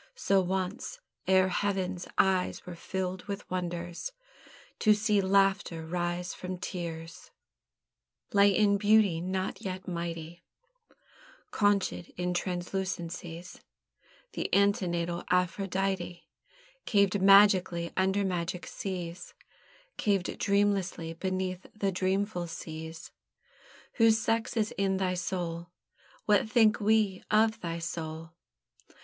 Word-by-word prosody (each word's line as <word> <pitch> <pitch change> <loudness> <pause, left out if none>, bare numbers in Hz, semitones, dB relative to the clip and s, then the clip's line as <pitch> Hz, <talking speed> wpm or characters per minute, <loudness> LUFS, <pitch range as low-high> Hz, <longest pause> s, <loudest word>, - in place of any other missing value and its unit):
So 195 - +2
once, 190 - -3 0.3
ere 190 0 +5
Heaven's 190 -1 -1
eyes 190 -1 +2
were 180 - -7
filled 185 +1 -4
with 200 -1 -5
wonders 175 - -3 0.7
To 215 -1 +5
see 210 -1 +2
Laughter 190 -4 +2
rise 175 +1 -2
from 185 0 -6
Tears, 170 -2 -6 1.0
Lay 200 0 +6
in 200 0 +3
beauty 205 -5 +4
not 185 +1 -3
yet 185 -1 -5
mighty, 170 -1 -5 1.1
Conchèd 205 -4 +1
in 180 0 -1
translucencies, 175 -1 -4 0.7
The - - -3
antenatal 175 -4 +1
Aphrodite, 180 0 -1 0.6
Caved 200 -2 +3
magically 190 -3 +5
under 190 +1 +2
magic 180 -1 -2
seas; 180 -2 -6 0.6
Caved 200 -3 0
dreamlessly 200 -5 +1
beneath 185 -1 -2
the 200 -2 0
dreamful 185 0 -1
seas. 160 0 -8 0.9
"Whose 225 -2 +5
sex 230 +1 -1
is 215 -1 +1
in 195 -1 +2
thy 185 -1 0
soul!" 175 -1 -3 0.6
What 210 +1 +3
think 220 -3 +4
we 210 -2 +2
of 220 +1 +3
thy 170 -1 -3
soul? 165 -1 -5
185 Hz, 105 wpm, -29 LUFS, 175-200 Hz, 1.1 s, Lay